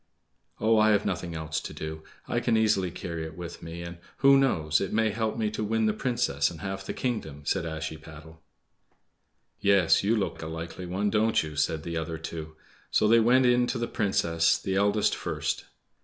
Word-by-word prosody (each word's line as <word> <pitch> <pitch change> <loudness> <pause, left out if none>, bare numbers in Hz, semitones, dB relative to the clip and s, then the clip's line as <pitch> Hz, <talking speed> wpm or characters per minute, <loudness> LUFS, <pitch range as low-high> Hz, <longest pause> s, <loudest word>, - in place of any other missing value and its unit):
"Oh, 110 +1 +4
I 110 0 +5
have 100 0 +1
nothing 90 -3 -3
else 80 0 -3
to - - -8
do. 80 0 -6 0.3
I 120 - 0
can 120 -1 +1
easily 105 -4 +2
carry 85 -1 -5
it 80 +1 -8
with 85 -1 -7
me, 85 +1 -7
and—who 85 +11 +2
knows?—it 95 - +2
may 110 0 +2
help 110 +1 -2
me 110 -2 0
to 110 0 -3
win 110 +1 +1
the 105 - +2
Princess 115 - 0
and 80 -3 -10
half 95 0 -4
the - - -4
kingdom," 80 - -3
said 95 +3 0
Ashiepattle. 80 0 -7 1.2
"Yes, 100 -4 +4
you 110 +4 +3
look 105 -3 -2
a 80 - -5
likely 85 +3 -6
one, 100 +3 -1
don't 110 -2 +2
you?" 75 -1 -7
said 75 +1 0
the 85 -1 -4
other 80 0 -3
two. 80 -1 -7 0.3
So - - +3
they 115 +2 +6
went 125 +3 +4
in 125 0 +4
to 125 - -2
the 115 0 -2
Princess, 85 -5 +1
the 95 - -3
eldest 100 +2 +2
first. - - -3
95 Hz, 190 wpm, -27 LUFS, 80-110 Hz, 1.2 s, they